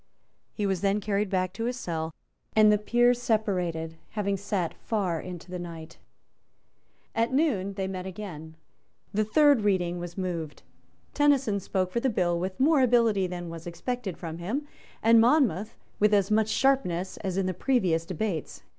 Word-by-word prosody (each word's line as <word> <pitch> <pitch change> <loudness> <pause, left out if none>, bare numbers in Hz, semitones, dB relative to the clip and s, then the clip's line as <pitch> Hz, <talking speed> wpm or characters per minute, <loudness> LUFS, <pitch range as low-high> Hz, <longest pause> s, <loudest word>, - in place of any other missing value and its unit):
He 210 - -3
was 190 -3 0
then 200 +1 +2
carried 205 0 -1
back 185 -1 0
to 225 +3 -3
his 245 +1 -2
cell; 165 -8 -3 0.4
and 215 -1 +7
the 210 - +3
Peers 240 +3 +3
separated, 180 -8 -1 0.2
having 200 -1 0
sate 195 -3 -2
far 190 -7 -2
into 180 0 -9
the 180 - -4
night. 165 -1 -9 1.1
At 230 +2 +1
noon 235 - +1
they 190 -1 -2
met 185 -1 -5
again. 170 -5 -8 0.6
The 215 +2 +2
third 285 +3 +4
reading 180 -4 +1
was 175 +1 -7
moved. 170 -5 -4 0.5
Tenison 275 -8 +3
spoke 185 -1 -1
for 235 - 0
the 265 - +1
bill 175 -6 +1
with 185 +1 -4
more 290 +1 +4
ability 230 -6 +3
than 175 -1 -6
was 165 0 -8
expected 210 +2 -4
from 165 -1 -6
him, 250 +12 -3 0.4
and 225 0 +7
Monmouth 230 - +2 0.2
with 210 0 +4
as 200 0 +2
much 215 0 +3
sharpness 195 -10 +1
as 190 -1 -3
in 195 - +1
the 185 - -1
previous 180 -6 +1
debates. 175 -1 -4
195 Hz, 165 wpm, -27 LUFS, 175-225 Hz, 1.1 s, and